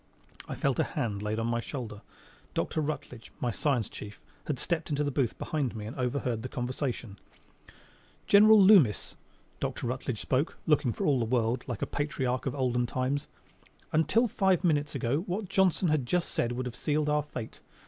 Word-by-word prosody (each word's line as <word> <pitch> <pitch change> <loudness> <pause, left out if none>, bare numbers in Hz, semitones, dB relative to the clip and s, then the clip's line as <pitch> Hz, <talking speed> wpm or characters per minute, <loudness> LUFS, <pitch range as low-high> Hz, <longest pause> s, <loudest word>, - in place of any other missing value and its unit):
I - - -4
felt - - 0
a - - +5
hand 105 -4 -3
laid 105 +1 -2
on 115 - -1
my 115 0 0
shoulder. 115 -4 -6 0.5
Dr. 155 - 0
Rutledge, 140 -6 -5
my 120 - 0
science 125 0 0
chief, 105 0 -9 0.3
had 150 - -1
stepped 170 +4 -2
into 145 -1 0
the 145 - -1
booth 130 -4 0
behind 140 -7 -2
me 105 -1 -5
and 110 - -6
overheard 125 -3 -1
the 130 - -5
conversation. 125 -4 -4 1.1
"General 215 +1 +7
Loomis," 185 - +5 0.4
Dr. - - -3
Rutledge 125 -2 -3
spoke, 135 +5 0
looking 145 -5 +3
for - - -3
all 140 -3 +3
the 115 - +1
world 120 +1 +1
like 120 -5 -3
a - - +2
patriarch 135 -3 -2
of 130 - -2
olden 125 -2 +1
times, 130 +4 -1 0.6
"until 220 +10 +3
five 190 -4 +2
minutes 150 -4 +1
ago 130 +4 0
what 190 +1 -3
Johnson 190 -2 +3
has 155 0 +3
just 170 +8 -1
said 120 +1 0
would 125 +1 -3
have 125 -1 -5
sealed 150 +3 0
our 150 0 +2
fate. 125 -6 -7
130 Hz, 180 wpm, -29 LUFS, 120-155 Hz, 1.1 s, General